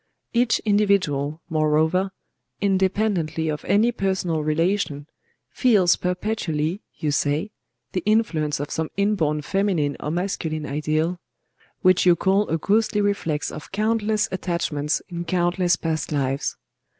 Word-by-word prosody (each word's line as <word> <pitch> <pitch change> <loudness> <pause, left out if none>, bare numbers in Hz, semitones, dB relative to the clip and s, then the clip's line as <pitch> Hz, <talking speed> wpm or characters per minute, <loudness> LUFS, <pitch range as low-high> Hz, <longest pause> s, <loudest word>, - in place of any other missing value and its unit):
Each 240 -1 +3
individual, 180 -8 +1
moreover, 160 +4 +2 0.5
independently 190 -5 +1
of 150 -1 -3
any 220 +4 +3
personal 190 -7 -1
relation, 155 -1 0 0.5
feels 205 -9 +4
perpetually, 180 -2 -2 0.2
you 150 - -1
say, 145 +8 0 0.4
the 185 - -1
influence 175 -10 +1
of 145 - -4
some 160 -1 -2
inborn 165 -8 +1
feminine 185 -6 0
or - - -4
masculine 160 -3 -2
ideal, 155 +4 -1 0.6
which 185 -1 +4
you 175 - +7
call 195 +4 +1
'a 160 - +1
ghostly 210 +5 +1
reflex 200 -7 -1
of 150 - -9
countless 215 +1 +1
attachments 170 -4 -1
in 170 -1 -4
countless 175 +1 +1
past 160 -2 -3
lives. 135 -1 -1
175 Hz, 120 wpm, -23 LUFS, 155-200 Hz, 0.6 s, you